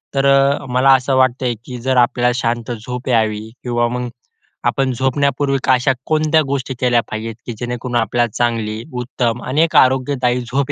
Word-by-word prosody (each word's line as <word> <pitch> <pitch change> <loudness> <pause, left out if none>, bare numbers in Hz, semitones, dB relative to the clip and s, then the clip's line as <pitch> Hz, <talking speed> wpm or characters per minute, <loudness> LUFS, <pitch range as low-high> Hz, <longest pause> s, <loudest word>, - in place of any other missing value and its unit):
तर 135 - +2
अ, 140 0 +3
मला 130 +2 +4
असं 130 +1 +2
वाटतंय 130 -1 +2
की 125 - -7
जर 130 0 0
आपल्याला 120 0 +3
शांत 120 -1 -2
झोप 125 +3 -6
यावी 110 -2 0
किंवा 120 -1 0
मग, 125 0 -3 0.5
आपण 135 -1 +1
झोपण्यापूर्वी 135 +2 0
अशा 130 0 +3 0.2
कोणत्या 155 0 +2
गोष्टी 135 -1 -2
केल्या 120 -2 +3
पाहिजे 110 +1 -4
की 120 - -5
जेणेकरून 120 0 -4
आपल्याला 120 +1 +1
चांगली, 115 -2 -1 0.2
उत्तम 120 -1 -2
अनेक 155 +5 +1
आरोग्यदायी 130 -1 +3
झोप 130 +3 -2
125 Hz, 155 wpm, -18 LUFS, 120-135 Hz, 0.5 s, मला